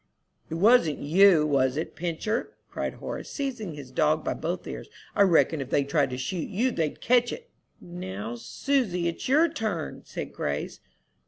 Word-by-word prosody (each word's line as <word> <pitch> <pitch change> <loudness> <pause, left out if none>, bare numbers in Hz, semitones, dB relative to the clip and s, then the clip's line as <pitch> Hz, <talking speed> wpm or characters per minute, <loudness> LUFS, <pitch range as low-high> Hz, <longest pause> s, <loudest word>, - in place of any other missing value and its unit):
"It 160 - -3
wasn't 190 -4 +5
you, 170 +1 +5
was 135 -2 +2
it, 160 - -4
Pincher," 175 +7 -2 0.2
cried - - -3
Horace, - - -6
seizing 245 - -4
his 140 -3 -10
dog 155 +2 +2
by - - -1
both 175 +3 -4
ears. - - -7 0.3
"I - - +3
reckon 165 -5 +4
if 135 - -6
they 140 - +2
tried 140 0 +1
to 125 - -4
shoot 160 +6 -3
you 245 +7 +1
they'd 160 -8 -2
catch 245 0 +3
it." 485 0 -8 0.3
"Now, 110 - -6
Susy, 180 - -1
it's 170 - -3
your 310 +5 +5
turn," 215 - -3
said - - -6
Grace. 70 0 -3
170 Hz, 170 wpm, -27 LUFS, 145-220 Hz, 0.3 s, wasn't